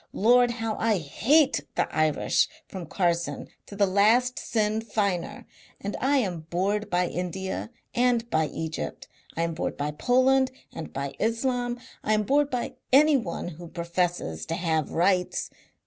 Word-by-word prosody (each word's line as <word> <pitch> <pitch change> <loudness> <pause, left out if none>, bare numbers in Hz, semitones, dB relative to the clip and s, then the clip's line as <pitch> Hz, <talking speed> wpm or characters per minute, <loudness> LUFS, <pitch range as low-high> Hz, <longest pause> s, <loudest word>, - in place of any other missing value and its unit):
Lord! 245 +3 +5
how 225 -2 -3
I 220 -2 +2
HATE 260 - +3
the - - +1
Irish 155 -1 +2 0.2
from 185 -4 -7
Carson 170 -1 -1 0.2
to 200 - -9
the 200 0 +4
last 220 +6 +3
Sinn 215 -1 0
Feiner! 200 -5 -2 0.3
And 200 +1 -4
I 280 +2 +2
am 175 -10 -2
bored 200 +4 0
by 180 0 +2
India 190 +4 -4 0.2
and 245 -1 +2
by 155 0 +2
Egypt. 160 +1 -5 0.3
I 165 - +1
am 165 0 -1
bored 160 - -3
by 145 +1 -2
Poland 255 - +3 0.2
and 165 - -7
by 140 0 -4
Islam. 245 +2 0 0.2
I 215 - +2
am 215 - +1
bored 285 +6 +2
by 250 -3 -3
anyone 270 - +3
who 170 +1 -10
professes 170 - -2
to 165 - -1
have 160 -4 0
rights. 180 +1 +1
200 Hz, 150 wpm, -26 LUFS, 170-240 Hz, 0.3 s, Lord